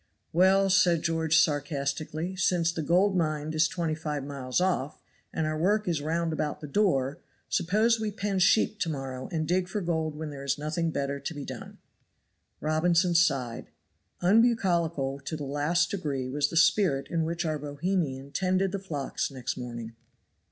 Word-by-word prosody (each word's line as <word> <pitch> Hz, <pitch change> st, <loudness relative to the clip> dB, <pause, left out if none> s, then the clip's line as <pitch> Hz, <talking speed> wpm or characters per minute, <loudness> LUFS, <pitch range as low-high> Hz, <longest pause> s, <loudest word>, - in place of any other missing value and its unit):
"Well," 190 Hz, +3 st, +4 dB
said 175 Hz, -3 st, +4 dB
George 160 Hz, -1 st, +2 dB
sarcastically, 150 Hz, +3 st, 0 dB
"since 175 Hz, -2 st, +2 dB
the 165 Hz, -, -4 dB
gold 185 Hz, +5 st, +3 dB
mine 155 Hz, -2 st, -1 dB
is 160 Hz, +1 st, +3 dB
twenty 165 Hz, -2 st, -2 dB
five 150 Hz, -3 st, -3 dB
miles 135 Hz, -2 st, -2 dB
off, 180 Hz, -6 st, -1 dB, 0.3 s
and 160 Hz, -, -1 dB
our 155 Hz, 0 st, -1 dB
work 205 Hz, +6 st, +1 dB
is 165 Hz, -4 st, 0 dB
round 165 Hz, +2 st, -1 dB
about 150 Hz, -1 st, -2 dB
the 150 Hz, -, -7 dB
door, 140 Hz, -6 st, +1 dB, 0.3 s
suppose 220 Hz, +6 st, +2 dB
we 220 Hz, -1 st, -1 dB
pen 200 Hz, -2 st, -2 dB
sheep 210 Hz, +3 st, +3 dB
to 165 Hz, -, 0 dB
morrow 135 Hz, -3 st, -5 dB
and 155 Hz, -2 st, -1 dB
dig 180 Hz, +1 st, +1 dB
for 210 Hz, +3 st, -3 dB
gold 160 Hz, -4 st, -1 dB
when 155 Hz, 0 st, -5 dB
there 140 Hz, -1 st, -8 dB
is 140 Hz, 0 st, 0 dB
nothing 155 Hz, +3 st, -1 dB
better 140 Hz, -2 st, -2 dB
to 140 Hz, +4 st, -5 dB
be 145 Hz, -1 st, -6 dB
done." -, -, -8 dB, 0.8 s
Robinson 170 Hz, +3 st, +2 dB
sighed. 135 Hz, -9 st, +1 dB, 0.5 s
Unbucolical 175 Hz, -, +2 dB
to 155 Hz, +3 st, -5 dB
the 150 Hz, -, -5 dB
last 150 Hz, +5 st, 0 dB
degree 145 Hz, -9 st, -2 dB
was 145 Hz, +3 st, 0 dB
the 165 Hz, -, -3 dB
spirit 160 Hz, -6 st, +3 dB
in 165 Hz, -1 st, +1 dB
which 170 Hz, +2 st, -2 dB
our 155 Hz, -2 st, -1 dB
Bohemian 145 Hz, -2 st, -2 dB
tended 185 Hz, +1 st, +1 dB
the 200 Hz, -, -3 dB
flocks 150 Hz, -8 st, -3 dB
next 130 Hz, -3 st, -4 dB
morning. 120 Hz, -2 st, -7 dB
160 Hz, 170 wpm, -28 LUFS, 145-180 Hz, 0.8 s, Well